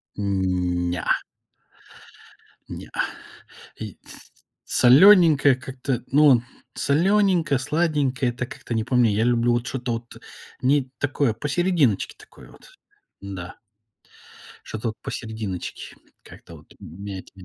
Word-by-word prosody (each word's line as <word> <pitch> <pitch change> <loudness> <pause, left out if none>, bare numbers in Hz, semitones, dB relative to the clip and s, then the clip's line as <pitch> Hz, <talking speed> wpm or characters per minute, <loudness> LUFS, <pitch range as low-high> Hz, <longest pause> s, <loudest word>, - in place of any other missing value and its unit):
М, 90 -3 -1
неа. 85 -2 0 1.5
Неа. - - -9 0.9
И 105 -5 -7
тс - - -14 0.3
солёненькое 150 0 +6
как-то, 130 -1 -4
ну, 140 -3 +5 0.3
солёненькое, 175 -1 +2
сладенькое- 145 -3 0
это 125 +1 -5
как-то 120 - -7
не 110 -1 0
по 125 - -1
мне. 120 -4 +4
Я 110 +2 +1
люблю 120 0 +2
вот 120 0 -1
что-то 125 -2 -3
вот 115 0 -7 0.4
не 135 0 +2
такое 145 -3 0
посерединочке 150 - 0
такое 430 - -16
вот, - - -18 0.5
н-да. 95 -3 -8 1.1
Что-то 110 +2 -4
вот 110 - -7
посерединочке, 110 -5 -6 0.3
как-то - - -14
вот - - -19
меня 95 +3 -8
это - - -14
125 Hz, 115 wpm, -23 LUFS, 110-145 Hz, 1.5 s, солёненькое